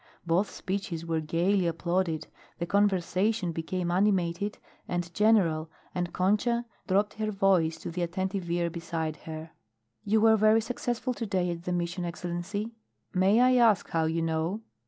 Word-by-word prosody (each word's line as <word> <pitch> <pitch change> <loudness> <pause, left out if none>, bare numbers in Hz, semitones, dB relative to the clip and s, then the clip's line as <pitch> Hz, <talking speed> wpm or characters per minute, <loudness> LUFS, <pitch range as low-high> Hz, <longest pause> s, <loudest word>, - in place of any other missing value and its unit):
Both 175 +4 +2
speeches 185 -4 -4
were 165 -1 0
gaily 175 +4 +1
applauded, 170 0 -1 0.3
the 170 - -2
conversation 195 0 +1
became 175 +2 -2
animated 190 0 +1 0.3
and 175 -1 -3
general, 180 -7 +3 0.2
and 175 -1 -2
Concha 225 +6 +1 0.2
dropped 205 +2 +2
her 215 0 -2
voice 190 -5 +2
to - - -5
the 175 +1 -3
attentive 185 +1 -2
ear 170 0 0
beside 165 -2 -3
her. 160 0 -6 0.5
"You 215 +2 +2
were 220 0 +5
very 215 +1 +5
successful 245 +2 -2
to 225 0 -4
day 180 -3 0
at 170 0 -6
the 180 - -2
Mission, 175 +1 -2
Excellency." 175 +5 -4 0.4
"May 190 +4 +4
I 255 0 +5
ask 225 -6 +4
how 165 -1 +1
you 165 +1 0
know?" 165 +6 -1
180 Hz, 155 wpm, -28 LUFS, 170-205 Hz, 0.5 s, were